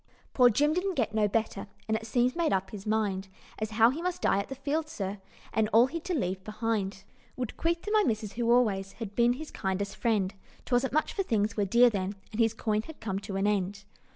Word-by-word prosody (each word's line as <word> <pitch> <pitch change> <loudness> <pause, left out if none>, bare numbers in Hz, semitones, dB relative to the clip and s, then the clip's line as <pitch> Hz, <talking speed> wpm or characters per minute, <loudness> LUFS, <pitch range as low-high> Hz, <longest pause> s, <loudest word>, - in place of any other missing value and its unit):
"Poor 250 -2 +6
Jim 295 +7 +2
didn't 365 +2 -1
get 235 -5 0
no 215 -1 +3
better, 205 -1 -1 0.2
And 220 - +1
it 220 0 -4
seems 245 +2 +2
made 335 -2 +1
up 190 0 0
his 205 -1 -8
mind, 205 -3 0 0.3
As 215 0 -2
how 225 +1 +7
he 305 +5 -5
must 360 0 -3
die 195 - +3
at 200 - -4
the 270 - -5
Fields, 300 +4 -2
sir, 195 0 -4 0.3
And 220 -1 +2
all 230 +2 +7
he'd 330 +5 -5
to 365 - -1
leave 190 - -2
behind 215 -3 -2 0.3
Would 250 -3 -4
'queath 335 +1 -1
to 420 - -4
my 430 -1 +5
missus, 215 -3 -1
who 235 0 +1
always 200 -6 +2
Had 220 -3 -7
been 240 +2 +4
his 305 +5 -8
kindest 195 +1 -2
friend 205 -5 +1 0.3
'Twasn't 250 +1 +1
much, 310 +3 +1
for 395 - 0
things 220 - 0
were 205 - +1
dear 235 +5 +5
then, 195 -1 -2 0.2
And 215 - -6
his 225 -1 +2
coin 215 -1 0
had 320 +6 -11
come 195 -3 -3
to 200 -1 -6
an 195 +1 0
end. 200 -1 0
220 Hz, 235 wpm, -29 LUFS, 200-255 Hz, 0.3 s, how